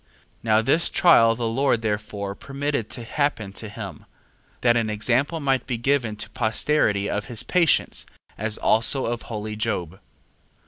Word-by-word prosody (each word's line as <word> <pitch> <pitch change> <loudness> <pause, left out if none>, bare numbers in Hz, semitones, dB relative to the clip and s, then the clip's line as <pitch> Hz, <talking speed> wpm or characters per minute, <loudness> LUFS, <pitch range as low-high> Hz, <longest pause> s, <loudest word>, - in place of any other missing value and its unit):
2:12. - - -38 0.3
Now 110 -1 +3
this 155 +8 +2
trial 115 -10 +5
the 120 0 -3
Lord 120 0 +1
therefore 105 -2 -3
permitted 140 0 -3
to 120 - -5
happen 115 -6 -1
to 110 +1 -7
him, 100 -7 -8 0.6
that 120 -1 +4
an 115 -2 +1
example 125 +9 0
might 135 -4 0
be 125 -3 -1
given 120 -3 0
to 105 - -5
posterity 110 -3 +1
of 105 -1 -2
his 115 -3 -3
patience, 175 -3 +1 0.3
as 110 +1 -2
also 115 +5 +2
of 120 0 -2
holy 110 -1 -4
Job. 95 -4 -3
115 Hz, 155 wpm, -24 LUFS, 105-135 Hz, 0.6 s, trial